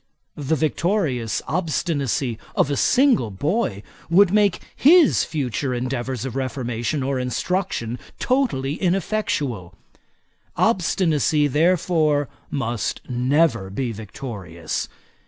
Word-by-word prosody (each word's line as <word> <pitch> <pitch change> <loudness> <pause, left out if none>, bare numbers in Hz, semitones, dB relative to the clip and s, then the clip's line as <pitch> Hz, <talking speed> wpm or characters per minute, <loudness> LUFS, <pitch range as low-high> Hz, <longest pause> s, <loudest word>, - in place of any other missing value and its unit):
The 145 +2 -1
victorious 155 - 0
obstinacy 145 - -1 0.2
of 145 - +2
a - - +1
single 250 - +3
boy 105 - -1 0.3
would 180 +2 +5
make 205 -3 +3 0.2
his 325 +2 +5
future 135 -3 -2
endeavours 125 0 -3
of 130 -2 -5
reformation 130 0 -2
or 135 0 -1
instruction 125 - -2 0.2
totally 235 - 0
ineffectual. 180 - -1 0.8
Obstinacy, 165 -7 +2
therefore, 155 -2 +2 0.2
must 120 -5 -3
never 125 -4 +1
be 120 +5 -2
victorious. 100 -6 -6
140 Hz, 95 wpm, -22 LUFS, 120-175 Hz, 0.8 s, would